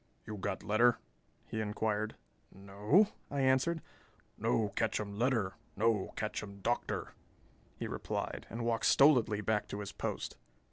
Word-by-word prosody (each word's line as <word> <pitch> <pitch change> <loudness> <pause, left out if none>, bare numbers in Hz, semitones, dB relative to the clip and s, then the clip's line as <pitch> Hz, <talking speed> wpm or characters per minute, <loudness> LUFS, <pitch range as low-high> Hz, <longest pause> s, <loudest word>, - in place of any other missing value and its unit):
"You 105 - -5
got 95 - -3
letter?" 110 +3 +4 0.5
he 110 - -3
inquired. 105 0 -1 0.4
"No," 105 - +3 0.2
I 140 -1 -1
answered. 130 +5 +2 0.5
"No 110 -2 +1
ketchum 105 0 -1
letter, 115 -7 +2 0.2
no 110 -1 +2
ketchum 100 -1 -4
Doctor," 120 +4 -1 0.6
he - - -3
replied, - - -4
and 115 +1 -4
walked 115 -1 +2
stolidly 120 -7 +5
back 105 0 0
to 100 - -5
his 100 -1 -5
post. - - -4
110 Hz, 130 wpm, -33 LUFS, 105-120 Hz, 0.6 s, stolidly